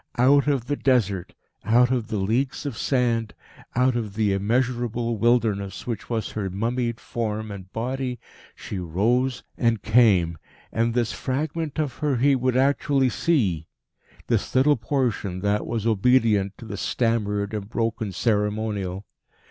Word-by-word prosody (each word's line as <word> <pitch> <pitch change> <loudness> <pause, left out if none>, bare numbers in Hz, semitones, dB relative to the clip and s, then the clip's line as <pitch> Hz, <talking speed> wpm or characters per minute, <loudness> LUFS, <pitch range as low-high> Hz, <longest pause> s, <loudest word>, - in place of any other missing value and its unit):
Out 140 +4 +5
of 135 -5 +1
the 145 - -1
Desert, 100 -10 0 0.3
out 120 +4 +4
of 120 -4 0
the 110 - -2
leagues 120 +10 -1
of 140 -5 -3
sand, 115 -3 0 0.4
out 125 0 +3
of 110 -4 -3
the 105 -2 +2
immeasurable 120 +2 0
wilderness 110 -4 +1
which 115 -4 -5
was 115 -2 -2
her 100 -3 -3
mummied 115 +4 -2
Form 110 -2 -3
and 95 -2 -9
Body, 125 +1 -3 0.4
she 100 - -6
rose 115 +9 0 0.2
and 115 -3 +1
came. 100 -9 +4 0.3
And 115 +1 0
this 120 -3 +1
fragment 150 +3 -3
of 150 -4 -2
her 145 -4 +1
he 140 +3 +4
would 130 0 +1
actually 135 0 +2
see 100 - 0 0.6
this - - -1
little 140 +3 +5
portion 115 -7 -1
that 105 +1 0
was 115 -2 -2
obedient 110 -3 +3
to - - -10
the - - -6
stammered 105 -3 0
and 105 -1 -4
broken 115 -2 -2
ceremonial. 105 -2 -1
115 Hz, 145 wpm, -24 LUFS, 105-125 Hz, 0.6 s, Out